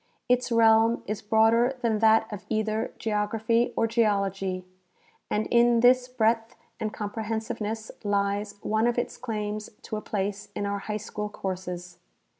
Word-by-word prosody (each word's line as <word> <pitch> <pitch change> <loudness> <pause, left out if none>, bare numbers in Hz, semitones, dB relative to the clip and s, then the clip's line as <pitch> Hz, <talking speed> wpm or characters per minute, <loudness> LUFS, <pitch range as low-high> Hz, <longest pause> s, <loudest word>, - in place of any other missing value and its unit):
Its 250 0 +2
realm 225 0 +4
is 210 +1 -3
broader 225 +4 +3
than 220 -2 +1
that 220 0 +5
of 205 - -7
either 220 0 -1
geography 225 +2 0
or - - +3
geology, 195 -5 0 0.6
and 210 +1 0
in 235 0 +5
this 250 +1 +5
breadth 225 -2 0 0.2
and 215 - -2
comprehensive 220 +2 -4
ness 220 +1 -4
lies 205 0 0
one 220 +2 +2
of 240 - 0
its 240 - -1
claims 210 -3 -4
to 215 - -4
a - - -5
place 205 0 -3
in 205 - -2
our 200 0 -2
high 210 +1 -3
school 210 0 -5
courses. 180 -3 -5
220 Hz, 150 wpm, -27 LUFS, 205-230 Hz, 0.6 s, that